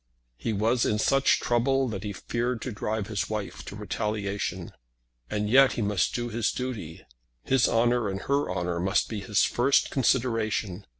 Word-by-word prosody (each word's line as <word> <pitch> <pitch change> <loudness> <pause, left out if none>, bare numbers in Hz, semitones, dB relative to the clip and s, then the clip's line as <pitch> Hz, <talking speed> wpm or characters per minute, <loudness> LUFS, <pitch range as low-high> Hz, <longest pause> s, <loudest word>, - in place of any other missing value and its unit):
He 115 - -2
was 115 +4 +1
in 105 - +1
such 135 +5 +3
trouble 130 +3 +1
that 100 -4 -4
he 105 - -3
feared 120 +4 -2
to 130 - -4
drive 110 0 -2
his 105 -2 -3
wife 110 -2 -4
to - - -8
retaliation; 100 -3 -3 0.6
and 105 0 -1
yet 135 +4 +6
he 115 - -2
must 100 -2 0
do 120 0 -2
his 115 0 0
duty. 115 -11 -5 0.4
His 135 -2 +3
honour 120 -1 +2
and 95 0 -4
her 140 +1 0
honour 90 -1 -2
must 95 +3 +1
be 110 - -4
his 105 0 +1
first 135 +3 +2
consideration. 115 -6 0
110 Hz, 170 wpm, -27 LUFS, 100-120 Hz, 0.6 s, yet